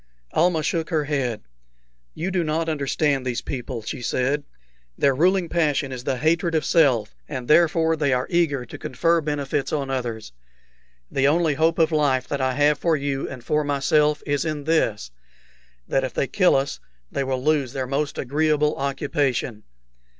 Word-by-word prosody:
Almah 165 Hz, -1 st, +2 dB
shook 165 Hz, 0 st, -1 dB
her 160 Hz, -4 st, +1 dB
head. 135 Hz, -6 st, -2 dB, 0.7 s
"You 180 Hz, +4 st, -3 dB
do 180 Hz, -2 st, +1 dB
not 160 Hz, +1 st, -1 dB
understand 145 Hz, -2 st, 0 dB
these 125 Hz, -2 st, -2 dB
people," 125 Hz, -3 st, -5 dB
said -, -, -15 dB
she. 135 Hz, +2 st, -1 dB, 0.5 s
"Their 140 Hz, -, +3 dB
ruling 180 Hz, +5 st, +2 dB
passion 150 Hz, -4 st, 0 dB
is 125 Hz, -1 st, -7 dB
the 130 Hz, -, 0 dB
hatred 165 Hz, +3 st, +1 dB
of 155 Hz, -, +1 dB
self, 130 Hz, -10 st, +3 dB, 0.2 s
and 130 Hz, -5 st, -5 dB
therefore 165 Hz, 0 st, +4 dB
they 145 Hz, -3 st, 0 dB
are 125 Hz, 0 st, +1 dB
eager 155 Hz, -7 st, +1 dB
to -, -, -10 dB
confer 165 Hz, +6 st, +1 dB
benefits 145 Hz, -1 st, -2 dB
on 140 Hz, -3 st, -2 dB
others. 120 Hz, -, -4 dB, 0.8 s
The 135 Hz, 0 st, +2 dB
only 160 Hz, +1 st, +2 dB
hope 160 Hz, +3 st, +2 dB
of 160 Hz, 0 st, +3 dB
life 145 Hz, -4 st, +1 dB
that 140 Hz, -1 st, -2 dB
I 130 Hz, -1 st, 0 dB
have 145 Hz, 0 st, +3 dB
for 165 Hz, -2 st, +2 dB
you 140 Hz, -1 st, -2 dB
and 130 Hz, -2 st, -9 dB
for 150 Hz, +4 st, +1 dB
myself 150 Hz, +1 st, +1 dB
is 145 Hz, -1 st, 0 dB
in 155 Hz, -2 st, -3 dB
this, 115 Hz, -, 0 dB, 0.8 s
that 135 Hz, -, +1 dB
if 130 Hz, -2 st, -4 dB
they -, -, +1 dB
kill 185 Hz, +6 st, +3 dB
us 135 Hz, +1 st, -1 dB, 0.3 s
they 140 Hz, -, -1 dB
will 130 Hz, -1 st, -2 dB
lose 145 Hz, -4 st, +1 dB
their 130 Hz, -2 st, -2 dB
most 140 Hz, +3 st, -2 dB
agreeable 150 Hz, +2 st, +1 dB
occupation. 135 Hz, -4 st, -1 dB
145 Hz, 170 wpm, -23 LUFS, 130-160 Hz, 0.8 s, therefore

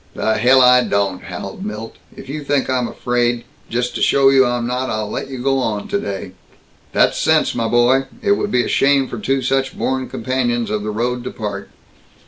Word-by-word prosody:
"The 110 Hz, -1 st, 0 dB
hell 130 Hz, +3 st, +5 dB
I 125 Hz, 0 st, +6 dB
don't!" 100 Hz, -4 st, -1 dB
howled 95 Hz, +2 st, -7 dB
Milt. 105 Hz, +2 st, -6 dB, 0.2 s
"If -, -, -11 dB
you 145 Hz, +2 st, -5 dB
think 140 Hz, -1 st, 0 dB
I'm 125 Hz, -2 st, 0 dB
afraid 120 Hz, -1 st, -1 dB, 0.3 s
Just 125 Hz, +1 st, -1 dB
to -, -, -4 dB
show 135 Hz, -1 st, +4 dB
you 135 Hz, -1 st, +5 dB
I'm 120 Hz, -1 st, -1 dB
not, 125 Hz, +2 st, -2 dB
I'll 110 Hz, -1 st, -3 dB
let -, -, -4 dB
you 135 Hz, -, -6 dB
go 135 Hz, +2 st, 0 dB
on 110 Hz, -5 st, -2 dB
today!" 100 Hz, -, -3 dB, 0.6 s
"That's -, -, +2 dB
sense, -, -, +2 dB
my 115 Hz, -1 st, -1 dB
boy. 120 Hz, +3 st, +3 dB, 0.2 s
It 200 Hz, -, +2 dB
would 205 Hz, 0 st, +1 dB
be 125 Hz, -10 st, +2 dB
a -, -, -3 dB
shame 140 Hz, -1 st, +3 dB
for 120 Hz, -, -6 dB
two 135 Hz, +4 st, 0 dB
such 135 Hz, +1 st, 0 dB
born 130 Hz, 0 st, -2 dB
companions 120 Hz, -2 st, -1 dB
of 105 Hz, -1 st, -1 dB
the 105 Hz, -, -4 dB
road 120 Hz, +3 st, -2 dB
to -, -, -3 dB
part!" 100 Hz, -3 st, -6 dB
125 Hz, 205 wpm, -19 LUFS, 110-130 Hz, 0.6 s, I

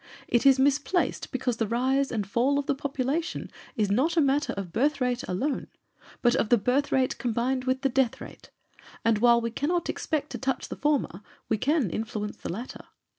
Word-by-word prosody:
It 240 Hz, +3 st, +3 dB
is 270 Hz, -1 st, +7 dB
misplaced 285 Hz, +6 st, +1 dB
because 255 Hz, -3 st, -1 dB
the 225 Hz, -, 0 dB
rise 260 Hz, +4 st, +1 dB
and 215 Hz, -4 st, -1 dB
fall 245 Hz, +8 st, +1 dB
of 285 Hz, -, -1 dB
the -, -, +1 dB
population 280 Hz, +4 st, -2 dB, 0.2 s
is 210 Hz, -2 st, 0 dB
not 285 Hz, +11 st, +1 dB
a -, -, +7 dB
matter 280 Hz, 0 st, +2 dB
of 190 Hz, -4 st, -6 dB
birth 280 Hz, +4 st, +1 dB
rate 250 Hz, -1 st, 0 dB
alone, 265 Hz, +11 st, -2 dB, 0.6 s
but 240 Hz, 0 st, +4 dB
of 215 Hz, -, 0 dB
the 240 Hz, -, +6 dB
birth 250 Hz, +7 st, +1 dB
rate 260 Hz, -1 st, +1 dB
combined 250 Hz, +2 st, -1 dB
with 260 Hz, 0 st, 0 dB
the -, -, +4 dB
death 255 Hz, -2 st, +1 dB
rate, -, -, -11 dB, 0.6 s
and 225 Hz, -2 st, +3 dB
while 235 Hz, +1 st, +5 dB
we 230 Hz, 0 st, -3 dB
cannot 330 Hz, +8 st, -1 dB
expect 305 Hz, -2 st, -3 dB
to -, -, -5 dB
touch 265 Hz, 0 st, -2 dB
the -, -, -5 dB
former 280 Hz, -, 0 dB, 0.3 s
we 220 Hz, -, +1 dB
can 280 Hz, -, +1 dB
influence 215 Hz, -1 st, -4 dB
the -, -, -5 dB
latter. 230 Hz, +8 st, -7 dB
255 Hz, 195 wpm, -27 LUFS, 230-280 Hz, 0.6 s, is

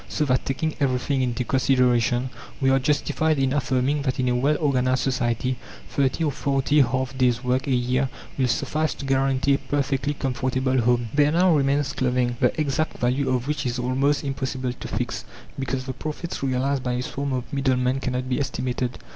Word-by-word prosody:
So 150 Hz, -, 0 dB
that, 130 Hz, -2 st, +1 dB
taking 155 Hz, +4 st, -1 dB
everything 135 Hz, 0 st, +1 dB
into 125 Hz, 0 st, -1 dB
consideration, 125 Hz, -1 st, +2 dB, 0.3 s
we 135 Hz, -1 st, +3 dB
are 135 Hz, -, +4 dB
justified 150 Hz, +2 st, +1 dB
in 135 Hz, -1 st, +1 dB
affirming 140 Hz, 0 st, +1 dB
that 130 Hz, -2 st, -2 dB
in 125 Hz, -1 st, +2 dB
a 125 Hz, -, +1 dB
well 140 Hz, +5 st, +2 dB
organized 130 Hz, -3 st, +1 dB
society 125 Hz, -1 st, 0 dB, 0.3 s
30 140 Hz, +3 st, 0 dB
or 150 Hz, -, +1 dB
40 140 Hz, +2 st, +2 dB
half 130 Hz, +1 st, 0 dB
days' 125 Hz, -1 st, +2 dB
work 125 Hz, +2 st, 0 dB
a 135 Hz, -, +2 dB
year 125 Hz, +2 st, +1 dB, 0.3 s
will 130 Hz, -2 st, +1 dB
suffice 155 Hz, +5 st, 0 dB
to 140 Hz, -, -7 dB
guarantee 135 Hz, 0 st, +2 dB
a -, -, +3 dB
perfectly 140 Hz, 0 st, -1 dB
comfortable 130 Hz, -1 st, 0 dB
home. 120 Hz, 0 st, +1 dB
There 145 Hz, 0 st, +4 dB
now 175 Hz, +2 st, +4 dB
remains 140 Hz, 0 st, +1 dB
clothing, 125 Hz, -1 st, 0 dB
the -, -, +1 dB
exact 155 Hz, +1 st, 0 dB
value 130 Hz, +3 st, 0 dB
of 130 Hz, 0 st, 0 dB
which 150 Hz, 0 st, -1 dB
is 120 Hz, 0 st, -2 dB
almost 135 Hz, +4 st, +1 dB
impossible 130 Hz, -2 st, -2 dB
to -, -, -8 dB
fix, -, -, -3 dB, 0.4 s
because 135 Hz, -1 st, -2 dB
the 130 Hz, -, -4 dB
profits 155 Hz, +5 st, -5 dB
realized 135 Hz, +1 st, 0 dB
by 125 Hz, -1 st, -2 dB
a 125 Hz, +1 st, -1 dB
swarm 140 Hz, +2 st, -3 dB
of 125 Hz, 0 st, -4 dB
middlemen 130 Hz, -1 st, +1 dB
cannot 130 Hz, -1 st, -2 dB
be 130 Hz, +1 st, 0 dB
estimated. 125 Hz, -2 st, -2 dB
130 Hz, 185 wpm, -24 LUFS, 125-140 Hz, 0.4 s, are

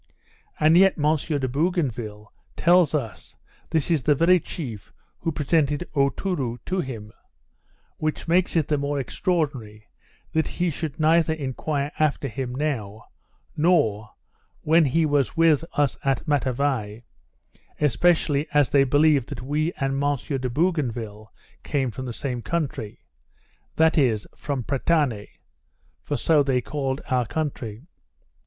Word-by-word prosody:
And 155 Hz, +2 st, +5 dB
yet 195 Hz, +1 st, +5 dB
M. 150 Hz, +1 st, +3 dB
de 145 Hz, -3 st, -2 dB
Bougainville 125 Hz, -, -2 dB, 0.2 s
tells 175 Hz, -2 st, +4 dB
us, 115 Hz, -8 st, -5 dB, 0.3 s
this 160 Hz, +1 st, 0 dB
is 160 Hz, -4 st, +2 dB
the 150 Hz, +3 st, +3 dB
very 175 Hz, +5 st, +4 dB
chief 120 Hz, -, -7 dB, 0.3 s
who 165 Hz, -, -1 dB
presented 150 Hz, +1 st, 0 dB
Aotourou 140 Hz, -2 st, 0 dB
to 185 Hz, +1 st, -1 dB
him; 115 Hz, -9 st, -5 dB, 0.9 s
which 155 Hz, +2 st, -3 dB
makes 175 Hz, +2 st, +2 dB
it 160 Hz, -4 st, +2 dB
the 150 Hz, -2 st, +1 dB
more 140 Hz, 0 st, -1 dB
extraordinary, 135 Hz, -, -2 dB, 0.4 s
that 160 Hz, 0 st, +1 dB
he 175 Hz, -1 st, -1 dB
should 155 Hz, 0 st, -5 dB
neither 160 Hz, +1 st, +3 dB
enquire 145 Hz, 0 st, -3 dB
after 150 Hz, -2 st, +1 dB
him 125 Hz, 0 st, -4 dB
now, 115 Hz, -8 st, -3 dB, 0.5 s
nor 110 Hz, -, +2 dB, 0.5 s
when 160 Hz, +1 st, +4 dB
he 160 Hz, +4 st, +2 dB
was 145 Hz, -2 st, 0 dB
with 165 Hz, -2 st, +4 dB
us 145 Hz, -3 st, +1 dB
at 135 Hz, +3 st, 0 dB
Matavai, 130 Hz, -6 st, -1 dB, 0.8 s
especially 150 Hz, +1 st, +2 dB
as 145 Hz, -5 st, +4 dB
they 140 Hz, -1 st, +5 dB
believed 145 Hz, -1 st, +3 dB
that 130 Hz, -4 st, -6 dB
we 150 Hz, +5 st, 0 dB
and 135 Hz, 0 st, -2 dB
M. 145 Hz, 0 st, +2 dB
de 130 Hz, -1 st, -3 dB
Bougainville 120 Hz, -, -2 dB, 0.3 s
came 135 Hz, -4 st, -1 dB
from 130 Hz, +4 st, -6 dB
the -, -, -4 dB
same 125 Hz, 0 st, -4 dB
country, 140 Hz, -9 st, -4 dB, 0.7 s
that 160 Hz, 0 st, +4 dB
is, 115 Hz, -7 st, +2 dB
from 140 Hz, -4 st, -3 dB
Pretane, 135 Hz, -5 st, 0 dB, 0.7 s
for -, -, -3 dB
so 155 Hz, -3 st, +3 dB
they 135 Hz, -3 st, +1 dB
called 135 Hz, +1 st, -3 dB
our 125 Hz, -3 st, 0 dB
country. 130 Hz, -5 st, -4 dB
145 Hz, 135 wpm, -24 LUFS, 125-160 Hz, 0.9 s, And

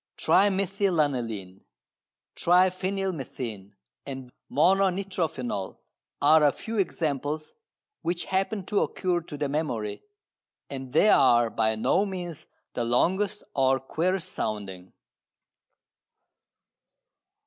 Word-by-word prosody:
Trimethylaniline, 155 Hz, -, +1 dB, 0.7 s
triphenylmethane 180 Hz, -, 0 dB, 0.3 s
and 130 Hz, -2 st, -7 dB, 0.2 s
mononitrophenol 180 Hz, -, 0 dB, 0.4 s
are 155 Hz, 0 st, +5 dB
a 145 Hz, -, +6 dB
few 225 Hz, +7 st, -5 dB
examples 155 Hz, -4 st, -2 dB, 0.5 s
which 175 Hz, +1 st, -2 dB
happen 195 Hz, +1 st, -1 dB
to 205 Hz, -, +1 dB
occur 180 Hz, -2 st, 0 dB
to 150 Hz, -2 st, -9 dB
the 145 Hz, 0 st, -1 dB
memory, 135 Hz, -8 st, -2 dB, 0.7 s
and 135 Hz, -2 st, -6 dB
they 210 Hz, -, +5 dB
are 120 Hz, -, +5 dB
by 110 Hz, 0 st, +1 dB
no 175 Hz, -, +2 dB
means 175 Hz, -6 st, -6 dB, 0.3 s
the 120 Hz, -, -1 dB
longest 185 Hz, -, +1 dB
or 135 Hz, -1 st, +3 dB
queerest 180 Hz, +7 st, -1 dB
sounding. 95 Hz, -4 st, -4 dB
155 Hz, 90 wpm, -27 LUFS, 125-185 Hz, 0.7 s, a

